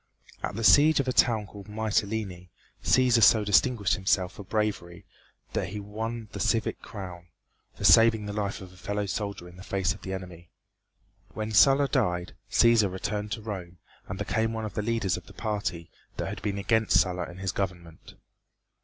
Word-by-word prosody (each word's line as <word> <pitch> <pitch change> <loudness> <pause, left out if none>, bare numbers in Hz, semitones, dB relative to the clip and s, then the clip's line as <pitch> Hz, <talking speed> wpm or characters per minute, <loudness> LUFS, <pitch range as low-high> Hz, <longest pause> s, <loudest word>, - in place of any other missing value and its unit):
At - - -4
the 115 - -4
siege 150 +7 +6
of 135 - 0
a 130 - 0
town 115 -5 +3
called 100 0 -12
Mytelene 105 -4 -2 0.3
Cæsar 125 -2 +4
so 105 0 +6
distinguished 105 0 +3
himself 95 -2 +1
for 100 - -9
bravery 100 -4 -3 0.5
that - - -1
he 105 - -6
won 110 +3 -5
the 100 - -7
civic 110 +3 0
crown, 90 -4 -9 0.5
for - - -9
saving 115 -2 +6
the 105 - -5
life 100 -2 -3
of 95 -1 -11
a - - -17
fellow 105 +2 -3
soldier 100 -2 -4
in 90 +1 -14
the 95 - -11
face 95 -1 -1
of 100 - -14
the 95 - -6
enemy. 90 -3 -8 0.9
When 110 0 -3
Sulla 135 +7 +5
died, 90 -11 -1 0.2
Cæsar 115 -4 +4
returned 105 +2 -4
to 110 - -5
Rome, 95 -5 -6 0.3
and 95 - -5
became 110 +3 -1
one 110 -1 -3
of 105 - -6
the 105 - -2
leaders 105 -5 0
of - - -11
the - - -13
party 100 -7 -4 0.3
that - - -3
had - - -6
been 100 0 -2
against 110 +2 +2
Sulla 90 -1 0
and 90 +2 -11
his 95 -2 -2
government. 85 -4 -6
105 Hz, 185 wpm, -27 LUFS, 95-110 Hz, 0.9 s, siege